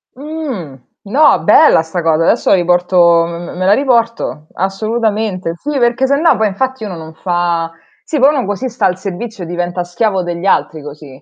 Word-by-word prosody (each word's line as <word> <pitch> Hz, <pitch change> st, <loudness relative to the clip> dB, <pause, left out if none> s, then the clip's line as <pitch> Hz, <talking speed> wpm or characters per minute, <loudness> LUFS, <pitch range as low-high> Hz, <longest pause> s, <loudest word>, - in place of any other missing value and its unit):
Mh. 275 Hz, -, -6 dB, 0.3 s
No, 285 Hz, +8 st, +4 dB
bella 305 Hz, -, +5 dB
'sta 165 Hz, +2 st, -4 dB
cosa. 165 Hz, 0 st, +1 dB
Adesso 230 Hz, -, +1 dB
la -, -, +6 dB
riporto 175 Hz, -1 st, +3 dB
m 170 Hz, -, -6 dB, 0.2 s
m -, -, -10 dB
me 185 Hz, -, -1 dB
la 200 Hz, -, +5 dB
riporto. 230 Hz, -, 0 dB
Assolutamente. 205 Hz, -2 st, -2 dB
Sì, 290 Hz, -, -4 dB
perché 240 Hz, +2 st, +2 dB
sennò 280 Hz, +1 st, +3 dB
poi 220 Hz, 0 st, +1 dB
infatti 255 Hz, +5 st, -3 dB
uno 195 Hz, -5 st, -5 dB
non 160 Hz, 0 st, -10 dB
fa 170 Hz, -1 st, -1 dB, 0.3 s
sì, 300 Hz, -, -3 dB
poi 270 Hz, +2 st, +6 dB
uno 255 Hz, -, -1 dB
così 205 Hz, +6 st, -3 dB
sta 235 Hz, -, -2 dB
al 180 Hz, -, +1 dB
servizio 195 Hz, +2 st, -6 dB
e -, -, -7 dB
diventa 175 Hz, +1 st, -3 dB
schiavo 190 Hz, +1 st, -1 dB
degli 175 Hz, +1 st, -5 dB
altri 160 Hz, -5 st, 0 dB
così. 145 Hz, -2 st, -11 dB
190 Hz, 185 wpm, -14 LUFS, 170-240 Hz, 0.3 s, la